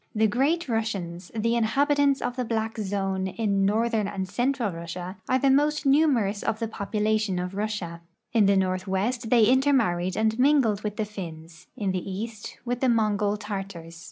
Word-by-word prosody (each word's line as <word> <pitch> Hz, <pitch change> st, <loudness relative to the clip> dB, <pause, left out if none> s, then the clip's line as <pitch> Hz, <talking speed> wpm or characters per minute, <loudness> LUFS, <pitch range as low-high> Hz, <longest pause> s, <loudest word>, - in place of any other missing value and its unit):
The 220 Hz, +1 st, +3 dB
Great 280 Hz, +10 st, +1 dB
Russians, 195 Hz, -7 st, -3 dB
the 230 Hz, +2 st, +1 dB
inhabitants 280 Hz, +4 st, +2 dB
of 245 Hz, -, -2 dB
the 255 Hz, -, -1 dB
black 225 Hz, -1 st, -2 dB
zone 195 Hz, -2 st, -1 dB
in 195 Hz, -1 st, 0 dB
north 230 Hz, +3 st, +1 dB
ern 215 Hz, -3 st, +1 dB
and 190 Hz, -2 st, -4 dB
central 240 Hz, +2 st, 0 dB
Russia, 175 Hz, +3 st, -6 dB
are 255 Hz, -, +4 dB
the 270 Hz, +1 st, +3 dB
most 295 Hz, +2 st, +2 dB
numerous 265 Hz, -8 st, +3 dB
of 225 Hz, -1 st, -1 dB
the 225 Hz, 0 st, -2 dB
poioulation 215 Hz, -1 st, -1 dB
of 180 Hz, +1 st, -4 dB
Russia, 195 Hz, -5 st, -3 dB, 0.3 s
In 215 Hz, -4 st, +4 dB
the 200 Hz, 0 st, +4 dB
northwest 190 Hz, +6 st, -1 dB
they 235 Hz, -2 st, +5 dB
intermarried 230 Hz, -9 st, +2 dB
and 220 Hz, +1 st, +1 dB
mingled 255 Hz, -7 st, +3 dB
with 210 Hz, -1 st, -3 dB
the 215 Hz, -, -1 dB
Finns; 165 Hz, -5 st, -9 dB
in 200 Hz, -3 st, -1 dB
the 185 Hz, +1 st, -3 dB
east 215 Hz, +2 st, -6 dB
with 245 Hz, 0 st, -2 dB
the 260 Hz, -, +2 dB
Mongol 210 Hz, -2 st, +1 dB
Tartars. 195 Hz, -6 st, -6 dB
215 Hz, 175 wpm, -26 LUFS, 190-240 Hz, 0.3 s, they